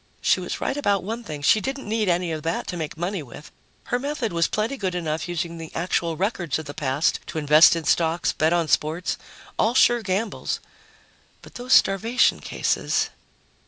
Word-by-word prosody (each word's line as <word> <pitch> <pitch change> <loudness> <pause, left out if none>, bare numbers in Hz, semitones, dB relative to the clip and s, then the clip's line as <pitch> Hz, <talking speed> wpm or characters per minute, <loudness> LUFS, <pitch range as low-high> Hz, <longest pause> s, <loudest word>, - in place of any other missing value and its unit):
She - - +2
was - - -4
right - - -1
about 205 -9 +1
one 225 +5 -5
thing: 150 -8 -7
she 215 +8 +4
didn't 270 +4 -4
need 215 -2 0
any 175 -1 +1
of 155 -1 -3
that 165 +2 -2
to - - -3
make 160 -2 -5
money 175 +2 -2
with; 145 +2 -12 0.3
her 245 - -1
method 265 -7 -3
was 170 -1 +2
plenty 220 +6 -1
good 190 -8 -3
enough, 160 -1 -2
using 170 -1 -3
the 160 -1 -8
actual 165 -1 -1
records 185 - -1
of 160 - -7
the 145 - -7
past 140 +2 0
to - - -6
invest 155 +2 +6
in 165 - -3
stocks, 165 +2 +1
bet 155 +1 +1
on 170 -2 +1
sports 155 +4 0 0.4
all 230 +3 +2
sure 240 -2 +5
gambles. 205 +2 -2 0.8
But - - -14
those 250 +1 -1
starvation 225 +6 +4
cases.... - - -1
175 Hz, 190 wpm, -24 LUFS, 160-215 Hz, 0.8 s, invest